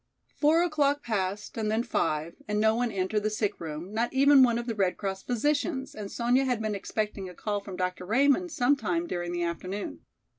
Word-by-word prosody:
Four 315 +3 +4
o'clock 290 -4 +1
passed 205 -2 -2
and 215 -1 0
then 220 +2 +1
five 165 -8 -1
and 210 0 0
no 220 +1 +4
one 240 0 0
entered 195 +2 0
the 215 - 0
sick 210 -1 -2
room, 165 +4 -6
not 230 +2 0
even 275 +1 +6
one 240 -2 +5
of 240 - -3
the 235 - -2
Red 195 -4 0
Cross 195 -2 -3
physicians, 270 +3 -1
and 205 -2 -7
Sonya 245 +3 +2
had 250 -3 0
been 215 -1 -2
expecting 205 -1 -3
a 180 - -12
call 205 +2 -2
from 200 -2 -8
Dr. 180 0 -3
Raymond 280 - +3
some 280 +2 +3
time 335 +4 -1
during 175 - -3
the 175 0 -1
afternoon. 170 - -4
215 Hz, 210 wpm, -28 LUFS, 190-265 Hz, -, even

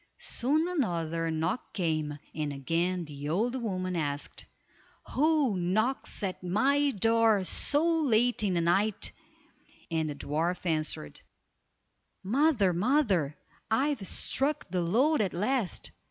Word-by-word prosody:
Soon 305 +7 0
another 170 - -1
knock 160 +8 -2
came, 155 -5 -1 0.2
and 150 -2 -2
again 170 +6 -1
the 145 -1 -6
old 240 +9 0
woman 185 -4 -2
asked, 145 -3 -3 0.7
"Who 295 -6 +2
knocks 210 +9 0
at 190 -2 -3
my 275 +11 +2
door 225 -2 +3
so 290 - +1
late 245 -5 +3
in 195 -4 +1
the 170 - +2
night," 190 +5 +1 0.8
and 160 -1 0
the 145 - -4
dwarf 165 +6 -2
answered:— 155 - -2 1.0
"Mother! 230 - +3
mother! 190 - +1 0.3
I've 245 -2 0
struck 290 +2 -1
the 180 -1 0
lode 245 - +2
at 195 - -1
last." 210 +1 -1
190 Hz, 120 wpm, -29 LUFS, 165-255 Hz, 1.0 s, door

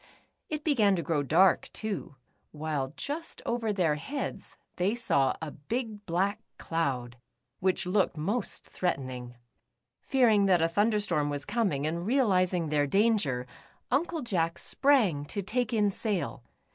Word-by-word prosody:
It 305 -1 -3
began 220 -11 +3
to 170 - -2
grow 160 -4 0
dark, 165 +6 +4
too, 210 -9 -5 0.4
while 150 -3 -3
just 320 +4 -4
over 235 -2 0
their 180 -6 +2
heads 275 - -5 0.2
they 190 +5 +1
saw 140 - +2
a 155 - -4
big 215 - -5
black 190 +4 0 0.2
cloud, 130 -7 -2 0.4
which 190 0 +1
looked 185 -2 +1
most 200 +9 -2
threatenino;. 130 -8 -3 0.7
Fearincf 225 -7 +4
that 180 -2 +4
a - - +4
thunder 210 +5 +2
storm 150 -8 0
was 145 0 -3
coming, 190 - 0
and 170 +2 -2
realizing 185 - +2
their 145 -1 +2
danger. 195 - +2 0.5
Uncle 320 +3 0
Jack 170 -7 0
sprang 230 - +2
to 200 +7 -4
take 240 +4 -1
in 210 -3 +2
sail. 185 - -1
190 Hz, 140 wpm, -29 LUFS, 150-225 Hz, 0.7 s, dark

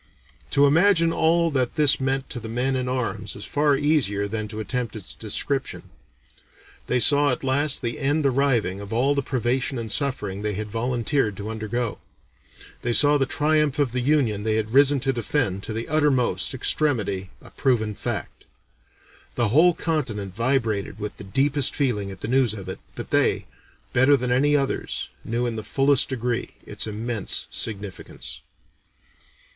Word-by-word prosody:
To 140 - +4
imagine 165 +2 +4
all 165 +1 +2
that 130 -4 0
this 150 -2 +4
meant 135 0 -1
to 120 - -4
the 110 0 -8
men 125 +4 0
in 125 -1 -2
arms 110 -5 -3
is 100 - -6
far 145 -1 +2
easier 135 -9 +1
than 110 +1 -3
to 110 +1 -7
attempt 120 +1 -3
its 105 -4 -8
description. 135 +5 -2 1.0
They 125 - +1
saw 145 +4 +6
at 130 - -1
last 140 +1 +1
the 120 -1 -3
end 145 +2 +1
arriving 125 -8 +1
of 100 - -9
all 130 +5 +2
the 140 - 0
privation 130 +1 -1
and 115 -2 -4
suffering 105 -8 -1
they 105 -1 -2
had 105 +1 -5
volunteered 120 -1 0
to 105 +2 -5
undergo; 110 +1 -3 0.8
they 120 - -1
saw 145 +3 +5
the 135 - +1
triumph 150 -1 +1
of 145 -5 +1
the 125 - -2
Union 125 -7 +1
they 110 +1 0
had 110 +1 -2
risen 140 +1 +5
to 135 0 +1
defend 120 -4 -1
to - - -5
the 115 +2 -4
uttermost 145 -4 +1
extremity 105 -10 0
a - - -16
proven 115 -6 0
fact. - - -5 0.9
The 120 -3 +1
whole 165 +8 +5
continent 115 - -2
vibrated 115 -4 -1
with 105 0 -5
the - - -9
deepest 135 +6 +1
feeling 110 -8 0
at 95 - -10
the - - -4
news 125 -3 +2
of 95 -3 -8
it, 95 - -6 0.2
but - - -7
they, - - +2 0.5
better 130 +3 +5
than 125 -1 -2
any 145 +4 +3
others, 140 -2 -2
knew 120 +2 -1
in 115 -2 -3
the 110 - -4
fullest 135 +2 +2
degree 125 -2 -3
its - - -3
immense 110 0 -3
significance. 100 -4 -5
125 Hz, 170 wpm, -24 LUFS, 110-140 Hz, 1.0 s, saw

